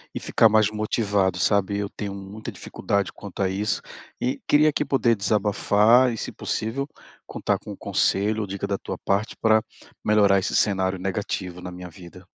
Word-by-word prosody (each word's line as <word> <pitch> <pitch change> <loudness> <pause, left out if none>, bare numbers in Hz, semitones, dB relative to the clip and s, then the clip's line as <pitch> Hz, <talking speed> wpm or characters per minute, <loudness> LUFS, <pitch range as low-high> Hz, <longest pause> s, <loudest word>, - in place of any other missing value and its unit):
e - - -2
ficar 115 - +4
mais 110 -1 +4
motivado, 100 -3 0
sabe. 100 0 +2
Eu 100 -1 -3
tenho 100 -2 -6
muita 100 +3 -8
dificuldade 100 -1 -2
quanto 100 0 -8
a 95 - +1
isso, 100 +3 -1 0.4
e 125 +2 -1
queria 150 +1 +5
aqui 150 - 0
poder 125 -4 +2
desabafar 105 +4 +3
e, 115 - -5
se - - -5
possível, 135 +6 -3 0.4
contar - - -1
com - - -9
o - - -8
conselho 105 +3 +1
ou 105 - -3
dica 100 +1 -4
da 100 - -1
tua - - -6
parte 100 +3 -1
para 110 -1 +3 0.4
melhorar 100 -2 +4
esse 95 - -2
cenário 95 -2 +1
negativo 95 -2 -3
na 90 - -7
minha 90 0 -9
vida. 90 +1 -13
100 Hz, 180 wpm, -24 LUFS, 95-110 Hz, 0.4 s, queria